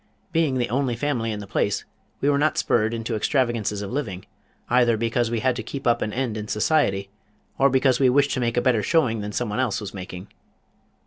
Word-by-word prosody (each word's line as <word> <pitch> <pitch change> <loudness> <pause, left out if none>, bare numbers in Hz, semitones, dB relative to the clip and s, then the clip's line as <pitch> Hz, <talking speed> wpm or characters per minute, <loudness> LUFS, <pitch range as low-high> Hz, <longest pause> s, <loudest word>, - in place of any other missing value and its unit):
Being 160 -6 +1
the 120 -2 -1
only 130 -1 0
family 120 -3 -1
in 105 -1 -4
the - - -7
place - - -1 0.4
we 140 - +2
were 140 - +2
not 155 +1 +1
spurred 110 -1 +2
into 115 0 -3
extravagances 110 -4 0
of 100 - -6
living, 110 -9 -4 0.4
either 120 -2 +3
because 115 +1 0
we 115 -1 -1
had 130 0 +2
to - - -2
keep 135 +4 -7
up 120 -1 +3
an 105 - -1
end 120 -2 -2
in 105 0 -5
society, 105 -6 +1 0.5
or 140 - +5
because 130 -1 +3
we 130 -2 +5
wished 140 +2 +3
to - - -1
make 120 -1 -1
a - - +4
better 120 -3 +2
showing 115 -3 +1
than 105 0 -4
someone 110 +1 -2
else 125 -6 0
was 105 -3 -7
making. 95 0 -8
120 Hz, 215 wpm, -24 LUFS, 105-130 Hz, 0.5 s, or